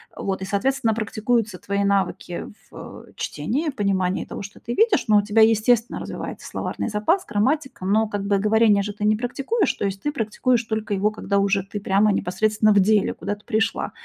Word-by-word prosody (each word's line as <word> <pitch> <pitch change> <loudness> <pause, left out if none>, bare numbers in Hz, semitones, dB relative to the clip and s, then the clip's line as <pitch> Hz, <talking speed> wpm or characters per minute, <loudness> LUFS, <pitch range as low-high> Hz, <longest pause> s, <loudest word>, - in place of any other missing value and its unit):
Вот, 190 -1 -3
и, - - -3
соответственно, 225 +3 0
практикуются 220 -1 -1
твои 200 +2 -2
навыки 190 -3 -1 0.2
в, - - -10
э, - - -21
чтении, 300 +7 -2
понимании 195 -6 -1
того, - - -7
что 200 +1 -10
ты 235 - -5
видишь, 445 -3 +3
но 215 -1 +5
у - - +5
тебя, 210 +2 +2
естественно, 225 +2 +3
развивается - - -7
словарный - - -4
запас, 225 - +1
грамматика. 260 +3 -1
Но, 215 +4 +2
как 205 -1 -4
бы, 200 -1 +2
говорение 210 0 +3
же 205 +1 -4
ты 210 0 -4
не 215 0 +4
практикуешь. 275 - -1
То - - -3
есть 195 0 -4
ты 295 - 0
практикуешь 235 -1 0
только 220 -1 -3
его, 200 +2 +2
когда 200 -2 -1
уже 200 -1 +1
ты 200 +2 -6
прямо, 200 +1 +2
непосредственно, 215 +3 +1
в 205 - +5
деле 210 +1 +2
куда-то 205 +1 -5
пришла. 220 -1 -1
210 Hz, 190 wpm, -23 LUFS, 200-230 Hz, 0.2 s, но